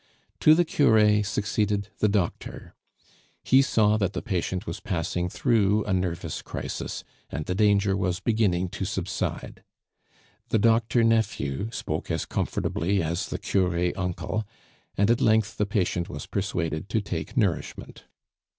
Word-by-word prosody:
To 155 - +7
the 175 +1 +3
cure 105 -8 +4
succeeded 105 0 -1
the 105 - +3
doctor. 100 -4 -2 0.7
He 130 +1 +5
saw 110 -5 +3
that 100 -2 0
the - - -4
patient 95 -3 -2
was 85 +4 -5
passing 90 -2 -2
through 105 -2 +2
a 105 - -1
nervous 85 -3 -2
crisis, - - -5 0.3
and 75 +1 -4
the 90 - -1
danger 100 -1 +3
was 90 -1 -1
beginning 100 -5 +1
to 95 - -5
subside. 95 -1 -3 0.9
The - - +2
doctor 115 +2 +3
nephew 110 -6 0
spoke 115 - -4
as - - -1
comfortably 95 +1 -1
as 85 +2 -2
the - - -4
cure 90 -2 0
uncle, 95 +4 -2 0.5
and 100 +3 +3
at 120 - +2
length 110 -1 +2
the 105 - 0
patient 95 -3 -1
was - - -6
persuaded 90 -4 -2
to 110 - +1
take 90 - -5
nourishment. 100 -8 -2
100 Hz, 140 wpm, -26 LUFS, 90-110 Hz, 0.9 s, To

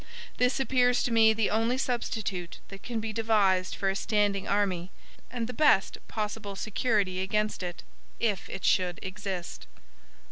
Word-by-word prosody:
This 250 +1 +2
appears 250 -2 +3
to 245 - -1
me 225 -1 +6
the 220 -1 +1
only 225 +4 +1
substitute 215 -8 -3
that 195 -1 -10
can 235 -2 -3
be 220 0 -4
devised 205 -5 +2
for 195 - -2
a 195 - +1
standing 205 -1 0
army, 190 -3 0 0.4
and 240 -2 -3
the 250 - -6
best 235 -7 +3
possible 210 -2 -4
security 205 -3 0
against 210 +2 -1
it, 175 -1 -5 0.4
if 210 -5 -1
it 195 - -5
should 180 -2 +2
exist." 190 -2 -5
210 Hz, 150 wpm, -28 LUFS, 190-225 Hz, 0.4 s, me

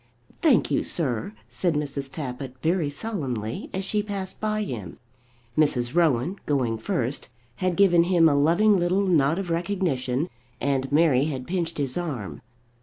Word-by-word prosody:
"Thank 295 -9 +3
you, - - +2
sir," 120 - +1
said 135 +8 -1
Mrs. 140 -2 -2
Tappitt 130 -2 -6
very 165 -2 +1
solemnly 135 - -4
as 190 0 -3
she 210 +1 0
passed 200 -2 -6
by 215 0 0
him. 105 - -6 0.6
Mrs. 125 -5 +2
Rowan, 165 +1 +2
going 125 -6 0
first, 125 +5 -2 0.3
had 185 -1 0
given 175 -3 +5
him 175 -2 +4
a 150 - +3
loving 170 +9 +4
little 185 +3 +1
nod 160 -4 +3
of 190 -3 -3
recognition, 165 -6 -1 0.3
and 135 -1 -1
Mary 145 -3 +4
had 135 -5 -4
pinched 170 -1 -2
his 140 +2 -1
arm. 135 - -5
155 Hz, 150 wpm, -25 LUFS, 130-180 Hz, 0.6 s, given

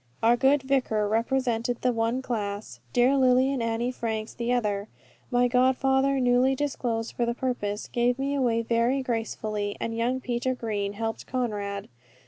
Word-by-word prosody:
Our 235 +2 +6
good 270 +3 +3
vicar 250 -6 +1
represented 235 +1 0
the 250 - +3
one 230 +2 -1
class, 205 - -4
dear 250 +3 +4
Lily 260 +1 +4
and 265 - -2
Annie 230 +2 -1
Franks 220 -3 -3
the 235 0 -2
other. 210 -4 0 0.4
My 245 0 +3
godfather, 265 +2 +2
newly 250 +1 +3
disclosed 245 -5 -2
for 240 - -1
the 235 0 0
purpose, 220 -5 -2
gave 240 +1 +1
me 275 +1 -1
away 240 -4 +1
very 235 +4 +1
gracefully, 215 -3 -3
and 230 - -3
young 240 +3 0
Peter 255 0 -1
Green 205 -4 -2
helped 225 +1 -4
Conrad. 205 -6 -3
240 Hz, 155 wpm, -27 LUFS, 225-255 Hz, 0.4 s, Our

